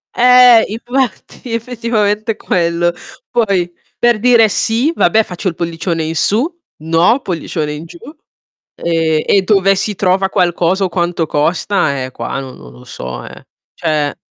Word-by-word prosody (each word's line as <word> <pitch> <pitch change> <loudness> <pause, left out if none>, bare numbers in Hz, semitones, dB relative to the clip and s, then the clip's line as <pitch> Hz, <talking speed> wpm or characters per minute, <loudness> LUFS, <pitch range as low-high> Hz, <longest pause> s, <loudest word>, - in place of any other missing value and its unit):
Eh, 250 -2 +7
infatti. 240 +1 -4
Effettivamente 225 -2 -1
è - - -23
quello. 175 -2 0 0.4
Poi, 195 -7 0 0.3
per 240 -2 +2
dire 235 -1 +5
"sì", 230 - +1
vabbè 220 - +3
faccio 180 0 -6
il 170 - -2
pollicione 165 -1 -3
in 160 +1 -3
su, 215 - +1 0.4
"no" 165 +10 +3
pollicione 160 -3 -3
in 150 +2 -7
giù. 170 - -13 0.8
Ehm, 160 -2 0
e 195 - +3
dove 195 -1 +3
si 210 +2 -2
trova 190 0 +1
qualcosa, 180 +1 +1
o 190 - 0
quanto 175 -1 -1
costa, 150 -2 0
eh, 130 - -6
qua 120 +2 -5
non 130 -1 -9
non 60 -2 -13
lo 60 0 -15
so, 65 -1 -7
eh. - - -12 0.3
Cioè 150 -3 -1
180 Hz, 150 wpm, -15 LUFS, 165-220 Hz, 0.8 s, Eh